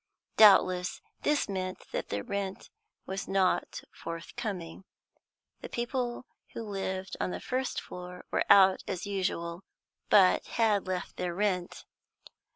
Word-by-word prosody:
Doubtless 185 -4 +6 0.2
this 295 -1 +1
meant 185 -2 -4
that - - -3
the 100 0 -2
rent 200 -1 -4 0.3
was 190 +1 -4
not 195 -1 +1
forthcoming. 170 +1 -6 0.8
The - - -8
people 240 0 -2 0.3
who 230 - -4
lived 190 -2 -4
on - - 0
the - - -4
first 255 0 -2
floor 180 0 -9
were - - +1
out 190 -1 +7
as 185 -1 -3
usual, 185 -3 -2 0.5
but 190 -3 +6
had 215 -4 +2
left 185 -1 -4
their 175 -1 -2
rent. 185 -3 -1
190 Hz, 125 wpm, -30 LUFS, 180-205 Hz, 0.8 s, out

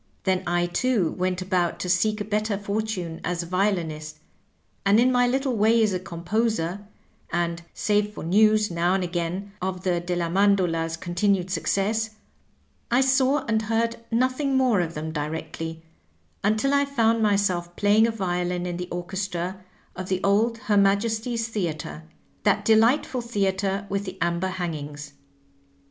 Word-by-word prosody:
Then 190 -1 +1
I, 175 0 +2
too, 190 0 +1
went 185 0 -1
about 180 -2 0
to - - -3
seek 210 +4 +2
a 205 - -3
better 210 0 -1
fortune 200 -5 -3
as 175 -1 -2
a - - -8
violinist, 165 -5 -1 0.7
and 200 +2 +4
in 250 +2 +4
my 245 -1 +3
little 265 0 0
way 220 +2 +4
as 210 -3 +2
a 185 - -1
composer, 185 +2 -2 0.4
and 170 0 -1
save 210 0 +1
for - - -6
news, 215 +4 +4
now 170 +2 +1
and 190 - 0
again, 175 +3 -3
of 185 0 -3
the 180 -2 +1
Delia 175 0 -2
Mandola's 175 -3 +2
continued 180 +2 0
success, 215 +3 0 0.7
I 245 +2 +4
saw 265 +2 +3
and 220 -3 +1
heard 230 +1 0
nothing 255 +3 +1
more 250 -6 +3
of 170 -1 -4
them 155 +1 -4
directly, 160 +1 -5 0.6
until 215 +7 +2
I 280 0 +4
found 230 -5 +2
myself 190 -5 +1
playing 210 +2 +4
a - - 0
violin 180 -3 -2
in 175 -1 -3
the 180 0 -5
orchestra 185 +1 -4 0.3
of 185 0 -6
the 185 0 -1
old 220 +4 +2
Her 220 -4 0
Majesty's 220 +4 +1
Theatre, 170 -8 -4 0.4
that 205 0 +2
delightful 230 +4 +3
theatre 200 -3 -1
with 200 +1 -2
the 185 0 -7
amber 170 +2 0
hangings. 150 -5 -5
195 Hz, 155 wpm, -25 LUFS, 175-220 Hz, 0.7 s, and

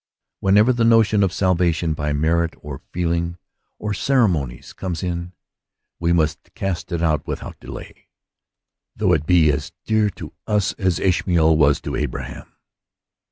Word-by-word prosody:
Whenever 105 +6 +4
the 120 -1 0
notion 115 -2 +4
of 95 -3 +2
salvation 85 -3 +1
by 75 -1 -2
merit, 80 +3 +1
or 75 -3 -7
feeling, 85 0 -1 0.4
or 105 -1 -3
ceremonies 95 - 0
comes 90 -3 -4
in, 85 -1 -3 0.7
we 85 0 +1
must 80 -3 0
cast 95 -1 -3
it 85 -1 -1
out 80 -2 0
without - - -6
delay, - - -10 0.9
though 95 -4 +2
it 75 -1 0
be 85 -4 +5
as 70 - -4
dear 110 -1 +2
to - - -10
us 105 -2 +1
as 95 -3 +1
Ishmael 85 -3 +3
was 75 -2 +4
to - - -4
Abraham. - - -5
85 Hz, 145 wpm, -21 LUFS, 80-100 Hz, 0.9 s, be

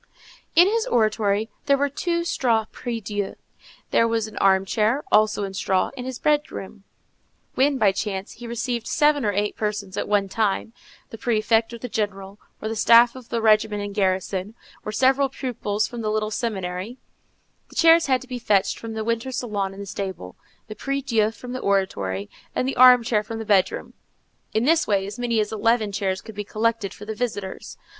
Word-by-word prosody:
In 350 - +8
his 445 +2 0
oratory 215 -2 +1 0.2
there 280 -1 +4
were 285 +1 +1
two 340 +4 -1
straw 235 -9 +1
prie 240 -2 -4
Dieu, 205 -1 -2
and - - -8 0.6
there 230 - +4
was 225 -1 0
an 215 -1 -10
armchair, 205 +7 +2
also 215 -1 +3
in 195 -1 -4
straw, 190 -1 0
in 250 - -6
his 260 -1 -5
bedroom. 290 -10 -1 0.7
When, 275 +1 +2
by 205 -5 +4
chance, 195 0 -4
he 240 - -10
received 235 0 -3
seven 295 -3 +3
or 210 - +1
eight 205 +1 -1
persons 205 -2 -3
at - - -2
one 205 -1 +2
time, 210 +2 -1 0.4
the 225 - -9
prefect, 225 -1 +1
or 235 - -7
the 250 - -6
general, 205 -3 -4 0.2
or - - -4
the 225 - -3
staff 235 +2 +6
of 255 -2 -12
the 230 -1 -2
regiment 215 -1 +3
in 205 0 -5
garrison, 190 +1 -1 0.3
or 215 - -4
several 265 +4 +3
pupils 215 -6 -2
from 240 -1 -7
the 215 - -1
little 215 0 -1
seminary, 195 0 -3 0.7
the - - -16
chairs 330 -1 +6
had 260 -2 +2
to 260 - -12
be 250 -1 -5
fetched 205 -4 +1
from 225 -1 -7
the 220 0 -3
winter 230 +3 -2
salon 210 -7 -2
in 195 - -11
the 200 - -6
stable, 190 - -6 0.3
the 215 - -8
prie 275 +5 -3
Dieu 220 -5 +2
from 245 +3 -10
the 255 - -3
oratory, 100 - -1 0.3
and 255 - 0
the 270 - -2
armchair 245 -3 +6
from 225 +2 -7
the 225 - -5
bedroom: 200 -3 +1 0.6
in 220 +2 +1
this 325 +3 +3
way 195 -2 +1
as 205 +4 -7
many 235 -2 0
as 210 -1 -1
eleven 220 0 +1
chairs 190 -2 -2
could 220 - -11
be 205 0 -4
collected 220 -1 -1
for 210 - -11
the 220 - -4
visitors. 210 -4 -5
220 Hz, 195 wpm, -23 LUFS, 200-245 Hz, 0.7 s, In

